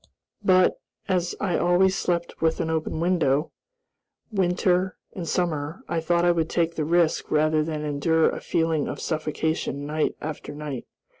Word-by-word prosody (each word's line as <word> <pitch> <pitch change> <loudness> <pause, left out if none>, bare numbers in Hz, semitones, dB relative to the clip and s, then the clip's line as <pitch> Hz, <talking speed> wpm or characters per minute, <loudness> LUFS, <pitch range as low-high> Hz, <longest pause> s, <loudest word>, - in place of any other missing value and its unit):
But, 185 -2 +4 0.3
as 180 -2 0
I 185 -4 0
always 180 +2 +3
slept 170 -2 -2
with 160 0 +2
an 160 - -1
open 160 0 -2
window, 160 -4 +1 0.8
winter 185 -1 +1 0.2
and 175 -3 -5
summer, 160 -2 -1
I 170 - 0
thought 170 +1 +2
I 175 - +5
would 165 -2 0
take 170 -1 +1
the 155 -2 -2
risk 170 0 +2
rather 155 0 +3
than 155 -1 -3
endure 155 +2 +2
a - - -2
feeling 160 -2 0
of - - -5
suffocation 155 -2 -2
night 155 +1 -1
after 150 -1 -6
night. 145 -4 -6
165 Hz, 155 wpm, -25 LUFS, 155-175 Hz, 0.8 s, I